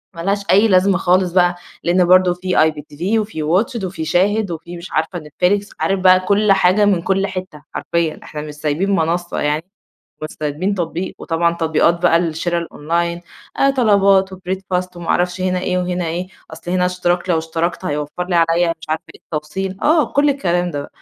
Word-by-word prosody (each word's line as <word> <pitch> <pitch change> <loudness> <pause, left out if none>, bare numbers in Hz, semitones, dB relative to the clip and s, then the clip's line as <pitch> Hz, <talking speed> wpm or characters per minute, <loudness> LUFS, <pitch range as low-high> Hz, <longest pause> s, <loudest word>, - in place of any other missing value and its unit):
ما 165 - -6
لهاش 200 +2 -1
أي 205 +4 +5
لازمة 190 -1 +3
خالص 180 -1 +2
بقى، 175 -1 +3 0.3
لإن 175 +1 +3
برضه 185 0 +5
في 185 +1 -2
IPTV 155 +7 0
وفي 205 -8 -4
Watch 220 - +1
it - - -7
وفي 175 -3 -5
شاهد 195 +4 +1
وفي 170 +2 -7
مش 170 - -10
عارفة 165 +3 -1
نتفليكس، 180 +7 -1
عارف 195 -1 0
بقى 185 0 +6
كلّ 200 +2 +2
حاجة 195 +2 +4
من 190 -4 +2
كلّ 195 +2 0
حتّة 185 -5 -7
حرفيًا، 170 -2 -1
إحنا 150 -1 -7
مش 150 -1 -7
سايبين 155 +7 -1
منصّة 170 +1 -1
يعني، 150 +2 0 0.6
مش 155 - -4
سايبين 160 +7 -1
تطبيق، 175 +1 -3
وطبعًا 170 0 0
تطبيقات 165 +1 +1
بقى 165 -1 +5
الشرا 170 +1 -1
الOnline، 170 +3 -1 0.4
آآ 275 - +5
طلبات 195 -4 +4
وBreadfast 185 -1 -4
وما 170 - -8
أعرفش 180 +1 0
هنا 185 0 0
إيه 180 0 -1
وهنا 180 -1 -2
إيه، 175 +3 -3 0.3
أصل 170 +2 -7
هنا 180 0 +2
اشتراك 180 0 -1
لو 165 - +3
اشتركت 165 +3 -2
هيوفّر 150 +3 -3
لي 175 - 0
عليَّ 170 +1 +2
مش 160 - -12
عارفة 160 +2 -1
إيه - - -18
التوصيل، 185 +5 -4
آه 310 0 +4
كلّ 285 +1 +3
الكلام 175 -10 0
ده؛ 145 -1 -5
180 Hz, 185 wpm, -18 LUFS, 165-190 Hz, 0.6 s, بقى